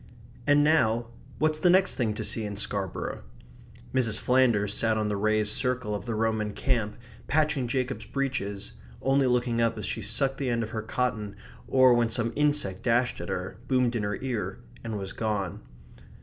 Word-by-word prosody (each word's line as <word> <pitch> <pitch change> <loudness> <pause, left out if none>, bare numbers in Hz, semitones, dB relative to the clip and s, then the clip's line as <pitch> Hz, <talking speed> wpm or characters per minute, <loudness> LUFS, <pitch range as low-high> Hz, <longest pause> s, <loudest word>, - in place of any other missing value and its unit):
And 145 0 +5
now, 120 -7 +2 0.3
what's 155 0 +1
the 180 - +4
next 190 +2 +4
thing 110 -4 -1
to - - -3
see 115 - -2
in 105 -1 -4
Scarborough? 100 -2 -3 0.7
Mrs. 115 -5 +2
Flanders 120 -6 +3
sat 110 0 +1
on 105 -1 0
the 105 - -1
raised 105 +1 +2
circle 125 -2 0
of 100 -2 -4
the 115 - -1
Roman 110 -1 0
camp, 110 -3 -1 0.3
patching 150 -3 +1
Jacob's 130 +1 -2
breeches; 105 -7 -3 0.3
only 135 0 +2
looking 125 -1 +1
up 115 -1 +1
as 105 - -4
she - - -2
sucked 135 +6 +1
the 135 -3 -1
end 115 -1 0
of 110 - -6
her 110 - -3
cotton, 110 -3 -2 0.3
or 130 -1 +6
when 120 -1 +2
some 115 0 -1
insect 145 -11 +1
dashed 120 +1 +1
at - - -6
her, - - -4
boomed 125 -2 +2
in 115 - 0
her 105 0 -2
ear, 120 -6 -2 0.3
and 110 -2 -3
was 95 -1 -5
gone. 105 -5 -2
115 Hz, 180 wpm, -27 LUFS, 105-130 Hz, 0.7 s, or